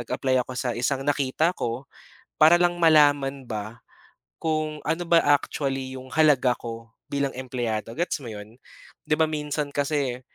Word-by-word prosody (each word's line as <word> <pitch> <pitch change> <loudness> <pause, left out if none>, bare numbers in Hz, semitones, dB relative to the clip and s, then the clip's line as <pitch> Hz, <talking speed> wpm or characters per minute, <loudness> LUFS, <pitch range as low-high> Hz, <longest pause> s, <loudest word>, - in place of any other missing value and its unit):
nag-apply 130 +2 0
ako 130 - -8
sa 125 - -2
isang 135 +2 -1
nakita 145 +4 +1
ko 120 +3 -3 0.6
para 160 +2 +8
lang 175 0 +2
malaman 145 -4 +4
ba, 110 +2 -6 0.6
kung 155 -1 -2
ano 160 +3 -1
ba 170 0 +4 0.2
actually 135 -2 -2
yung 130 0 -11
halaga 145 -5 +4
ko 115 -1 -7 0.2
bilang 140 -1 -2
empleyado, 120 -4 -3
gets 175 +4 -1
mo 125 -5 -9
'yon? 105 +3 -11 0.5
Di 150 - 0
ba 160 - +4
minsan 150 -1 -3
kasi, 140 -3 -1
135 Hz, 150 wpm, -25 LUFS, 125-155 Hz, 0.6 s, para